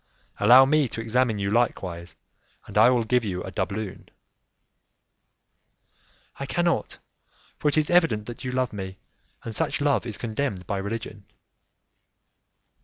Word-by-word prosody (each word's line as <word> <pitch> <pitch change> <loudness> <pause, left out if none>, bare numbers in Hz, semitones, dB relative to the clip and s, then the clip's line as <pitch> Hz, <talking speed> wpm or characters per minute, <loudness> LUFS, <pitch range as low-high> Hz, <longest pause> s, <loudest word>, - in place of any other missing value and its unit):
"Allow 130 +2 +8
me 150 0 +3
to 115 - -7
examine 115 0 +1
you 100 0 -2
likewise, 90 -7 -1 0.5
and - - -12
I - - +7
will 125 -2 +2
give 125 +2 +1
you 90 -4 -3
a 95 - -7
doubloon." 100 +1 -4 2.3
"I 140 - -4
cannot, 175 +3 0 0.6
for - - -2
it 145 - +2
is 155 +1 +1
evident 165 -12 +3
that 120 +2 -8
you 130 - -3
love 130 -2 -1
me, 95 -2 -6 0.5
and 115 -2 -6
such - - -1
love 145 -3 +1
is 110 - -4
condemned 110 -5 -3
by 100 - -2
religion." 100 0 -6
115 Hz, 140 wpm, -25 LUFS, 100-130 Hz, 2.3 s, Allow